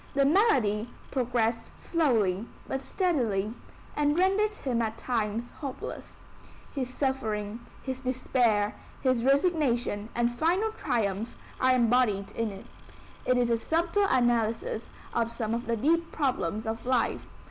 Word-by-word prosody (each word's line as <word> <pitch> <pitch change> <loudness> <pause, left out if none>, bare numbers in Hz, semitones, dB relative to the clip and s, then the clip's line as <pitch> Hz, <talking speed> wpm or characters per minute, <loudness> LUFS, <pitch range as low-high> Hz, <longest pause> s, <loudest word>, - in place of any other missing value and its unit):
The 275 0 +4
malady 255 - +3 0.2
progressed 240 -3 -1
slowly 230 - +1 0.2
but 270 - -2
steadily, 235 - 0 0.4
and 295 +1 +2
rendered 400 +3 +3
him 245 - -1
at 225 0 -2
times 230 -1 -2
hopeless. 275 -4 -6 0.6
His 255 -3 -2
suffering, 225 -6 -2 0.2
his 260 -1 -3
despair, 245 -5 +1 0.3
his 255 -3 +2
resignation 265 - +2
and 240 0 +2
final 350 - +1
triumph 220 - -1 0.2
are 255 0 +4
embodied 235 -5 +2
in 230 -1 -1
it. 195 -1 -9 0.6
It 255 - +4
is 240 -1 +2
a 230 - +3
subtle 340 - +1
analysis 240 - +1 0.2
of 230 0 0
some 230 -2 -2
of 235 0 -3
the 230 -1 +1
deep 330 +8 +2
problems 240 - -1
of 225 +1 -3
life. 255 -3 +1
245 Hz, 130 wpm, -28 LUFS, 225-280 Hz, 0.6 s, The